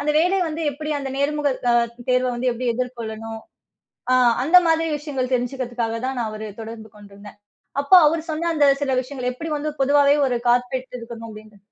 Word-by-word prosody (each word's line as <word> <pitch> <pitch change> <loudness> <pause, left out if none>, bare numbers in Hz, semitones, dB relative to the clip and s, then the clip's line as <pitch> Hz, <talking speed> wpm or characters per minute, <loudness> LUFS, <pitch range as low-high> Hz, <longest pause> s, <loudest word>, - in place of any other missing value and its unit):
அந்த 295 +1 0
வேலை 360 +4 +2
வந்து 315 +1 -5
எப்டி 305 +2 -6
அந்த 275 -1 -5
நேர்முகத் 285 -2 -1
அ 240 - +4 0.4
தேர்வ 250 0 +2 0.2
எப்டி 245 +2 -4
எதிர்கொள்ளணும், 225 -3 -5 0.7
அ - - +6 0.3
அந்த 355 +4 +7
மாதிரி 325 0 +2
விஷயங்கள் 270 -4 -4
தெரிஞ்சுக்கிறதுக்காகத் 245 -2 -3
தான் 265 -1 -3
அவர் 215 0 -6 0.2
தொடர்பு 220 0 -9
கொண்டிருந்தேன். 205 0 -14 0.4
அப்ப 280 - 0
அவரு 320 +2 0
சொன்ன 335 +2 -1
அந்த 295 -2 +4 0.2
சில 270 - -1
விஷயங்கள், 255 -1 -4
எப்டி 320 +6 -6
வந்து 300 +1 -3
பொதுவாவே 285 +1 +4
ஒரு 250 - 0
கார்பெட் 250 +1 0
இருக்குனு 230 -1 -9
அப்டின்னு, 215 -1 -13
255 Hz, 165 wpm, -22 LUFS, 230-290 Hz, 0.7 s, அந்த